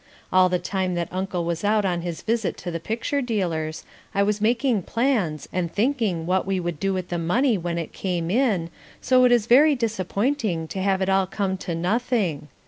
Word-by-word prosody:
All 185 Hz, 0 st, +6 dB
the 180 Hz, -, +1 dB
time 185 Hz, 0 st, -2 dB
that 170 Hz, -1 st, -2 dB
Uncle 185 Hz, -2 st, -2 dB
was 170 Hz, +1 st, -2 dB
out 210 Hz, 0 st, +2 dB
on 175 Hz, -2 st, 0 dB
his 170 Hz, -1 st, -5 dB
visit 225 Hz, -2 st, -1 dB
to 175 Hz, -, -5 dB
the 165 Hz, -, -3 dB
picture 230 Hz, -, -2 dB
dealers, 170 Hz, -10 st, -2 dB, 0.3 s
I 200 Hz, -, +3 dB
was 210 Hz, 0 st, 0 dB
making 235 Hz, 0 st, +2 dB
plans 210 Hz, -, 0 dB
and 175 Hz, -2 st, -1 dB
thinking 215 Hz, -8 st, 0 dB
what 185 Hz, +2 st, 0 dB
we 195 Hz, -1 st, 0 dB
would 170 Hz, -3 st, -4 dB
do 195 Hz, +2 st, 0 dB
with 185 Hz, -2 st, -3 dB
the 175 Hz, -, -2 dB
money 230 Hz, +10 st, +2 dB
when 175 Hz, -2 st, -3 dB
it 165 Hz, -, -5 dB
came 175 Hz, -3 st, -2 dB
in, 200 Hz, -9 st, +1 dB, 0.3 s
so 255 Hz, 0 st, +4 dB
it 250 Hz, -, +4 dB
is 240 Hz, -3 st, +4 dB
very 285 Hz, +6 st, +6 dB
disappointing 215 Hz, -, -1 dB
to 190 Hz, -, -4 dB
have 190 Hz, 0 st, +1 dB
it 190 Hz, -, -1 dB
all 190 Hz, -1 st, +3 dB
come 190 Hz, -1 st, -1 dB
to 175 Hz, -2 st, -4 dB
nothing. 185 Hz, -, 0 dB
190 Hz, 205 wpm, -24 LUFS, 175-225 Hz, 0.3 s, All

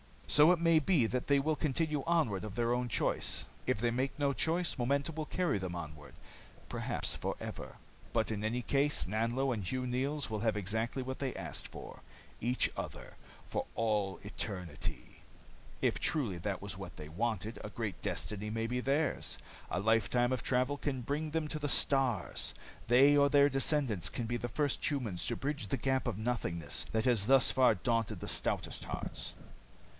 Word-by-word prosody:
"So 150 Hz, +4 st, +7 dB
it 180 Hz, -, +3 dB
may 165 Hz, -1 st, +5 dB
be 155 Hz, -5 st, +3 dB
that 125 Hz, +2 st, -2 dB
they 140 Hz, -1 st, +4 dB
will 155 Hz, +2 st, 0 dB
continue 150 Hz, 0 st, 0 dB
onward 140 Hz, -, +2 dB
of 110 Hz, -1 st, -6 dB
their 120 Hz, 0 st, +1 dB
own 125 Hz, 0 st, 0 dB
choice. 115 Hz, -, 0 dB, 0.2 s
If -, -, +1 dB
they 120 Hz, +1 st, +1 dB
make 130 Hz, +4 st, -1 dB
no 140 Hz, -1 st, +1 dB
choice, 170 Hz, +5 st, +1 dB
momentum 140 Hz, +5 st, 0 dB
will 155 Hz, -1 st, -2 dB
carry 175 Hz, -, 0 dB
them 90 Hz, -2 st, -4 dB
onward, 75 Hz, -3 st, -8 dB, 0.6 s
perhaps -, -, 0 dB
forever. -, -, -5 dB, 0.4 s
"But 110 Hz, -1 st, +1 dB
in 105 Hz, -1 st, -3 dB
any 115 Hz, +3 st, 0 dB
case, 140 Hz, +5 st, +2 dB
Nanlo 115 Hz, +6 st, 0 dB
and 110 Hz, -, -3 dB
Hugh 130 Hz, +8 st, -2 dB
Neils 135 Hz, +4 st, -1 dB
will 110 Hz, -1 st, -2 dB
have 110 Hz, 0 st, +1 dB
exactly 110 Hz, +6 st, -1 dB
what 130 Hz, +1 st, -5 dB
they 140 Hz, -, -1 dB
have -, -, -9 dB
asked -, -, -4 dB
for -, -, -10 dB, 0.4 s
each 125 Hz, +3 st, +1 dB
other, -, -, -6 dB, 0.3 s
for -, -, -3 dB
all 105 Hz, -4 st, 0 dB
eternity. 90 Hz, -, -5 dB, 0.6 s
If -, -, +2 dB
truly 120 Hz, -, 0 dB
that 95 Hz, +2 st, -3 dB
was 100 Hz, -1 st, -4 dB
what 95 Hz, -2 st, -8 dB
they 75 Hz, 0 st, -8 dB
wanted, 110 Hz, +5 st, -2 dB
a 105 Hz, -, -6 dB
great 105 Hz, -4 st, -4 dB
destiny 105 Hz, 0 st, -2 dB
may 115 Hz, +1 st, -1 dB
be 125 Hz, +1 st, -1 dB
theirs. 140 Hz, -, 0 dB, 0.3 s
A 90 Hz, -, -1 dB
lifetime 115 Hz, +3 st, +2 dB
of 130 Hz, -, 0 dB
travel 130 Hz, +3 st, +1 dB
can 135 Hz, -3 st, -2 dB
bring 150 Hz, +5 st, -2 dB
them 160 Hz, -1 st, -1 dB
to 155 Hz, -, -3 dB
the 145 Hz, -1 st, -2 dB
stars. 130 Hz, -9 st, +2 dB, 0.3 s
They 135 Hz, +5 st, +6 dB
or 140 Hz, 0 st, +5 dB
their 145 Hz, 0 st, +6 dB
descendants 135 Hz, -, +1 dB
can 120 Hz, -, -4 dB
be 120 Hz, +1 st, -1 dB
the 120 Hz, -, -3 dB
first 145 Hz, +3 st, 0 dB
humans 120 Hz, -, -2 dB
to 120 Hz, -, 0 dB
bridge 140 Hz, -5 st, -3 dB
the 135 Hz, -, -1 dB
gap 130 Hz, +1 st, 0 dB
of 115 Hz, -5 st, -1 dB
nothingness 90 Hz, -, -1 dB
that 110 Hz, 0 st, +1 dB
has 115 Hz, -5 st, +3 dB
thus 135 Hz, -1 st, +6 dB
far 130 Hz, -4 st, +5 dB
daunted 115 Hz, +2 st, -1 dB
the -, -, -4 dB
stoutest -, -, 0 dB
hearts." -, -, -4 dB
125 Hz, 185 wpm, -33 LUFS, 110-140 Hz, 0.6 s, So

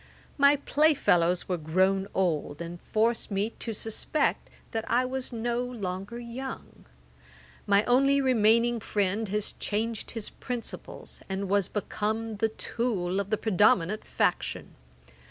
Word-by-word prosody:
My 280 Hz, 0 st, +6 dB
play 300 Hz, +2 st, +3 dB
fellows 175 Hz, -7 st, +2 dB
were 180 Hz, -2 st, -1 dB
grown 190 Hz, +5 st, +2 dB
old, 155 Hz, -5 st, 0 dB
and 170 Hz, 0 st, -7 dB
forced 225 Hz, +2 st, 0 dB
me 205 Hz, +2 st, -1 dB
to 230 Hz, -, -3 dB
suspect 225 Hz, +7 st, -1 dB, 0.2 s
that 225 Hz, -1 st, -2 dB
I 250 Hz, +2 st, +3 dB
was 260 Hz, 0 st, -3 dB
no 240 Hz, +1 st, -1 dB
longer 205 Hz, -3 st, -5 dB
young. 240 Hz, +2 st, -7 dB, 0.8 s
My 200 Hz, +1 st, +5 dB
only 275 Hz, +3 st, +4 dB
remaining 235 Hz, -2 st, +3 dB
friend 205 Hz, 0 st, 0 dB
has 210 Hz, +1 st, -1 dB
changed 220 Hz, +1 st, -2 dB
his 225 Hz, -3 st, -4 dB
principles, 245 Hz, -2 st, -6 dB
and 190 Hz, +1 st, -2 dB
was 200 Hz, -1 st, +2 dB
become 215 Hz, +1 st, -2 dB
the 225 Hz, +2 st, +1 dB
tool 205 Hz, -5 st, -1 dB
of 200 Hz, 0 st, -3 dB
the 215 Hz, -, +1 dB
predominant 205 Hz, -1 st, +3 dB
faction. -, -, -1 dB
215 Hz, 135 wpm, -28 LUFS, 195-240 Hz, 0.8 s, My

